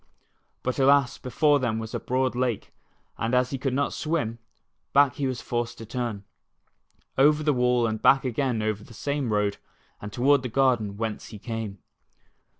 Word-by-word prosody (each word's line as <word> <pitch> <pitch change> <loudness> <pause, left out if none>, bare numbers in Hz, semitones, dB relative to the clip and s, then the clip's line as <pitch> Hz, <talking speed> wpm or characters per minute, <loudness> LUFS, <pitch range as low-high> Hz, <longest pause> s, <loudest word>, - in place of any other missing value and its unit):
But 130 +2 -2
alas, 140 -1 +4
before 145 +3 +2
them 120 -4 -1
was 110 0 -6
a - - -1
broad 130 +1 0
lake, 125 -4 -2 0.5
and 115 +2 0
as 125 0 +2
he 135 - -3
could 135 -1 -1
not 140 +1 0
swim, 145 -8 -2 0.5
back 140 -2 +4
he 140 - 0
was 130 -2 -3
forced 120 0 -2
to 115 - -8
turn. 115 -3 -4 1.0
Over 150 +2 +5
the 150 -1 +3
wall 125 -1 +2
and 110 -1 -2
back 135 0 +5
again 125 -2 0
over 110 -1 -2
the 115 - -14
same 140 -3 -2
road 105 -1 +1 0.4
and 105 - -6
toward 135 +5 +3
the 125 - -4
garden 115 -5 +1
whence 110 -1 -4
he 110 - -9
came. 110 -2 -5
125 Hz, 175 wpm, -26 LUFS, 110-135 Hz, 1.0 s, Over